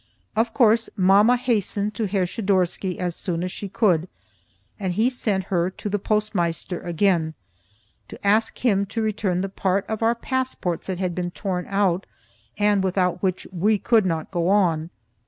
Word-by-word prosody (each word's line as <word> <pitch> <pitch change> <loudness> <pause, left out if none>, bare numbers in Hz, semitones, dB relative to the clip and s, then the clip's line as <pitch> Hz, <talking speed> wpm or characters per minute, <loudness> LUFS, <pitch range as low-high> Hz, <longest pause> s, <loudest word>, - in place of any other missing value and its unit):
Of 225 +1 +1
course, 225 -2 +3
mamma 200 +6 +5
hastened 210 -3 0
to 215 +1 -2
Herr 190 -1 +1
Schidorsky 185 -2 0
as 175 -2 -2
soon 170 -2 -3
as 185 - -3
she 200 - -6
could, 185 -6 +2 0.7
and 190 -3 -2
he 225 +7 +2
sent 210 -6 -1
her 175 0 +2
to 200 +2 -6
the 205 +1 -1
Postmeister 180 -5 -1
again, 170 -2 +1 0.7
to - - -10
ask 215 +3 +2
him 200 -4 +3
to 225 +3 -2
return 205 -4 0
the 195 - -1
part 195 0 -1
of 220 0 -3
our 230 +1 +3
passports 255 -8 -2
that 190 -2 -2
had 185 -1 -2
been 175 0 -2
torn 180 -1 -4
out, 195 -2 +1 0.5
and 205 -1 +2
without 180 -1 0
which 185 -2 -1
we 205 +4 +2
could 220 -1 +3
not 165 -1 -2
go 175 -1 0
on. 170 -5 +2
195 Hz, 170 wpm, -23 LUFS, 180-215 Hz, 0.7 s, mamma